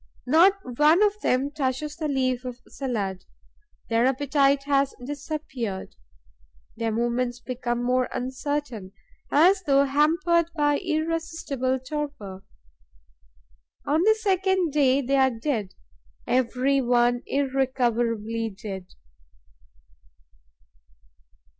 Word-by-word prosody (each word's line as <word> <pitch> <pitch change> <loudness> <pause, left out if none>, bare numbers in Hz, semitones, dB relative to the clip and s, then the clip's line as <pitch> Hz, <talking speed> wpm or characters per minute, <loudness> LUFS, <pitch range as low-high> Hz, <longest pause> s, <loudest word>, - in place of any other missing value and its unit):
Not 330 +9 +6 0.3
one 315 +7 +6
of 420 0 +1
them 265 +3 +1
touches 290 +1 -2
the 315 -2 -3
leaf 255 -3 0
of 250 -1 -7
salad; 200 -8 -3 0.6
their 230 +2 +2
appetite 275 +1 +2
has 275 -1 +1
disappeared. 275 -8 -5 0.8
Their 225 0 -2
movements 240 +2 -1
become 245 -1 -3
more 255 +1 +1
uncertain, 255 -5 -4 0.4
as 365 +7 +5
though 280 -5 +3
hampered 330 +4 +2
by 290 -2 +2
irresistible 315 -5 -2
torpor. 260 -8 -6 1.4
On 305 +3 +2
the 435 +4 +5
second 380 -5 +1
day, 275 -2 +3
they 275 +2 +1
are 265 0 +5
dead, 225 -5 -3 0.5
every 260 +2 +1
one 245 0 +2
irrecoverably 240 -5 0
dead. 195 -4 -6
270 Hz, 95 wpm, -25 LUFS, 240-300 Hz, 1.4 s, Not